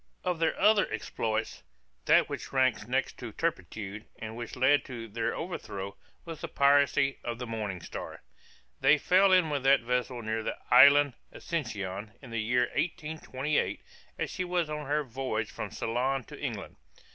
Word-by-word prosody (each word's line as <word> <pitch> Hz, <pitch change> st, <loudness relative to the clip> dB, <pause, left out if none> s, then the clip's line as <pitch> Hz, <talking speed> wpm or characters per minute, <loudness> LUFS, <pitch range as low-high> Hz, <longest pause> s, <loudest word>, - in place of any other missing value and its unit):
Of 180 Hz, -2 st, -1 dB
their 165 Hz, -1 st, +1 dB
other 210 Hz, -2 st, +4 dB
exploits, 110 Hz, 0 st, -2 dB, 0.4 s
that -, -, +5 dB
which -, -, -6 dB
ranks 130 Hz, -5 st, +2 dB
next 130 Hz, +2 st, -1 dB
in 115 Hz, -3 st, -6 dB
turpitude, 105 Hz, -, -4 dB
and 110 Hz, 0 st, -7 dB
which 120 Hz, -1 st, -6 dB
led 130 Hz, +3 st, +4 dB
to 120 Hz, -4 st, -7 dB
their 115 Hz, +1 st, -2 dB
overthrow, 100 Hz, -, -5 dB, 0.3 s
was 165 Hz, -3 st, -7 dB
the -, -, -3 dB
piracy 140 Hz, 0 st, +3 dB
of 120 Hz, -1 st, -3 dB
the 125 Hz, -, -5 dB
Morning 105 Hz, -6 st, -4 dB
Star. -, -, -8 dB, 0.6 s
They 150 Hz, -, +5 dB
fell 190 Hz, +5 st, +4 dB
in 180 Hz, -4 st, +4 dB
with 140 Hz, -2 st, 0 dB
that 135 Hz, 0 st, +5 dB
vessel 125 Hz, 0 st, -1 dB
near 110 Hz, +1 st, -1 dB
the -, -, -3 dB
island 140 Hz, 0 st, +8 dB, 0.2 s
Ascension, 105 Hz, -, -4 dB
in 130 Hz, -4 st, -12 dB
the 115 Hz, -1 st, -1 dB
year 125 Hz, +3 st, +2 dB
1828, 150 Hz, -3 st, -2 dB, 0.3 s
as -, -, -2 dB
she 185 Hz, -, -2 dB
was 175 Hz, -3 st, -1 dB
on 150 Hz, -2 st, -4 dB
her 150 Hz, +1 st, +1 dB
voyage 115 Hz, -4 st, -3 dB
from -, -, -5 dB
Ceylon 130 Hz, +3 st, -1 dB
to -, -, -11 dB
England. -, -, -5 dB
130 Hz, 165 wpm, -29 LUFS, 115-150 Hz, 0.6 s, island